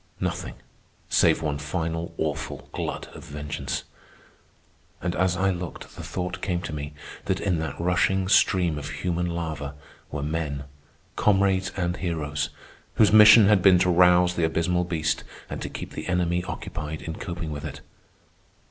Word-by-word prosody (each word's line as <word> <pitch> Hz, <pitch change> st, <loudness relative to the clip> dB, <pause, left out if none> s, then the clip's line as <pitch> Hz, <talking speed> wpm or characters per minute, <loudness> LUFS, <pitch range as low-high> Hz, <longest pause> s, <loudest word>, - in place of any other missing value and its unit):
—nothing, -, -, -3 dB, 0.5 s
save -, -, +4 dB
one 75 Hz, -2 st, -1 dB
final, 80 Hz, +2 st, -3 dB
awful 75 Hz, -1 st, -3 dB
glut -, -, -4 dB
of -, -, -10 dB
vengeance. 75 Hz, 0 st, -4 dB, 1.2 s
And 90 Hz, -1 st, -2 dB
as 90 Hz, -1 st, +1 dB
I 95 Hz, +1 st, +2 dB
looked 90 Hz, -2 st, -7 dB
the -, -, -7 dB
thought 90 Hz, -1 st, -4 dB
came 90 Hz, -2 st, -1 dB
to 85 Hz, -, -5 dB
me 70 Hz, 0 st, -5 dB, 0.3 s
that -, -, 0 dB
in 90 Hz, -5 st, 0 dB
that 80 Hz, -2 st, -4 dB
rushing 90 Hz, +2 st, +2 dB
stream 90 Hz, -5 st, +3 dB
of 75 Hz, 0 st, -6 dB
human 85 Hz, +4 st, -2 dB
lava 80 Hz, -4 st, -4 dB, 0.4 s
were 75 Hz, -1 st, -3 dB
men, 75 Hz, -2 st, -2 dB, 0.5 s
comrades 95 Hz, -2 st, +2 dB
and 90 Hz, -1 st, -1 dB
heroes, 75 Hz, -5 st, -2 dB, 0.5 s
whose 105 Hz, -2 st, +5 dB
mission 105 Hz, 0 st, +9 dB
had 100 Hz, -2 st, +5 dB
been 95 Hz, -1 st, +7 dB
to 90 Hz, 0 st, +3 dB
rouse 90 Hz, 0 st, +5 dB
the 85 Hz, -, -1 dB
abysmal 90 Hz, +2 st, +1 dB
beast 80 Hz, -3 st, -1 dB, 0.3 s
and -, -, -4 dB
to -, -, -4 dB
keep -, -, -7 dB
the -, -, -6 dB
enemy 90 Hz, -1 st, +1 dB
occupied 75 Hz, -3 st, -5 dB
in 80 Hz, -, -5 dB
coping 85 Hz, -4 st, -5 dB
with 70 Hz, -1 st, -5 dB
it. -, -, -6 dB
85 Hz, 155 wpm, -25 LUFS, 75-90 Hz, 1.2 s, mission